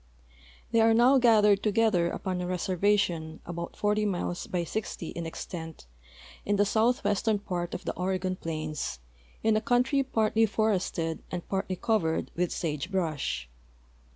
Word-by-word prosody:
They 230 - +4
are 225 0 +5
now 255 +4 +6
gathered 210 -4 +5
to 215 - +1
gether 205 -6 +3
upon 185 0 -3
a 180 - -3
reservation, 180 -3 0
about 170 0 -6
40 210 0 +1
miles 175 -2 -2
by 180 -2 -1
60 175 -1 -4
in 170 -1 -5
extent, 165 0 -7 0.6
in 205 - +1
the 205 0 +3
southwestern 220 -1 +2
part 180 -4 -4
of - - -7
the - - -1
Oregon 185 0 -1
plains, 155 - -4 0.5
in 220 -1 +3
a 215 - +2
country 250 +4 +2
partly 225 -3 +2
for 220 +1 +1
ested 165 -4 -2
and 180 -1 -5
partly 190 -1 -2
covered 180 -6 0
with 175 0 0
sage 150 -1 -3
brush. 155 - -2
190 Hz, 155 wpm, -28 LUFS, 170-215 Hz, 0.6 s, now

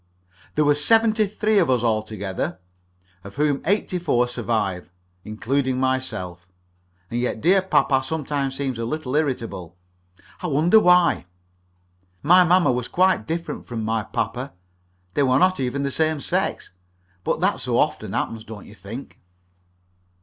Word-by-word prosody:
There 150 - +3
were 145 - +5
seventy 220 +7 +3
three 215 +1 +1
of 170 - +2
us 125 -3 +2
all 110 -2 +2
together, 100 -3 -4 0.7
of 100 - -11
whom 145 -1 +1
eighty 195 -2 +1
four 125 -8 +1
survive, 105 -7 -2 0.3
including 130 +4 -1
myself. 95 -10 -2 0.6
And 120 - -1
yet 120 -2 -2
dear 190 - +4
papa 140 -7 +2
sometimes 140 -1 -3
seems 130 -4 -3
a 115 - -2
little 140 +1 -3
irritable 115 - -2 0.7
I 180 - -2
wonder 165 +8 +4
why. 180 - +4 1.0
My 180 +5 +7
mamma 180 -1 +4
was 125 -1 -2
quite 185 - +2
different 165 +1 -4
from 115 -3 -4
my 110 0 0
papa. 120 +5 -4 0.6
They - - +1
were 130 -2 +3
not 185 +3 +3
even 135 +2 -1
of - - -1
the 140 - -1
same 155 +1 0
sex. - - -2 0.5
But - - -1
that - - +1
so - - -1
often - - 0
happens, 110 -1 -2
don't 110 -2 -10
you - - -13
think? 110 +7 -9
135 Hz, 150 wpm, -23 LUFS, 115-165 Hz, 1.0 s, My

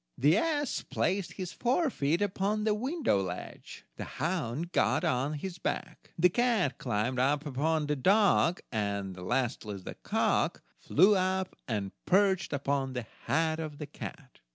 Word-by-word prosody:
The 150 +6 +4
ass 290 +2 0
placed 195 -1 -1
his 185 -3 -5
forefeet 235 - +1
upon 205 +2 0
the 215 -1 +2
window 255 - 0
ledge, 90 -1 -7
the - - -4
hound 165 -1 -2
got - - +2
on 130 +4 +1
his 170 +4 -5
back, - - -4
the 175 +2 +6
cat 220 - +1
climbed 120 +2 -1
up 140 +3 +2
upon 150 +3 0
the 150 0 0
dog, 185 +2 +3
and, 100 -4 -2
lastly, 110 +2 -2
the 95 - -8
cock - - 0 0.2
flew 195 +7 +5
up 185 0 0
and 105 -4 -2 0.2
perched 190 -1 +3
upon 140 -1 -1
the 125 -2 -4 0.2
head 160 +1 +1
of 155 -2 -5
the 150 - -5
cat. 145 -1 -9
160 Hz, 150 wpm, -30 LUFS, 130-190 Hz, 0.2 s, the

